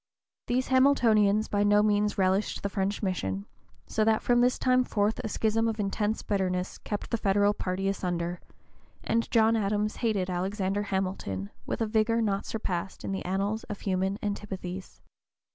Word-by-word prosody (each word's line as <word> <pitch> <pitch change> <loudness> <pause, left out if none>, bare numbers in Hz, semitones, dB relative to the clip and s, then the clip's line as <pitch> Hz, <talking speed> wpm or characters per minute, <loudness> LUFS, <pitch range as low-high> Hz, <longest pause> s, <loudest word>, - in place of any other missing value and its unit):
These 255 +1 0
Hamiltonians 225 -6 +4
by 205 - 0
no 205 0 +4
means 210 0 +2
relished 190 +2 +1
the 200 - 0
French 200 +1 -2
mission, 100 - -2 0.4
so 220 - 0
that 220 0 +2
from 240 0 +3
this 250 +1 +3
time 255 0 +3
forth 210 -2 0
a - - -3
schism 225 +1 +1
of 225 -1 -2
intense 210 +2 -1
bitterness 185 -2 -1
kept 205 - -5
the 230 - 0
Federal 205 +1 +3
party 195 -1 -2
asunder, 175 -3 -2 0.6
and 230 0 0
John 225 -1 +4
Adams 210 0 0
hated 210 -6 0
Alexander 190 +2 -1
Hamilton 185 - -3 0.2
with - - -3
a - - +3
vigor 220 +1 +2
not 200 -3 0
surpassed 190 -4 -4
in - - -3
the 195 - -3
annals 200 +4 -1
of 210 - -7
human 190 0 0
antipathies. 190 -3 -5
205 Hz, 160 wpm, -28 LUFS, 190-220 Hz, 0.6 s, Hamiltonians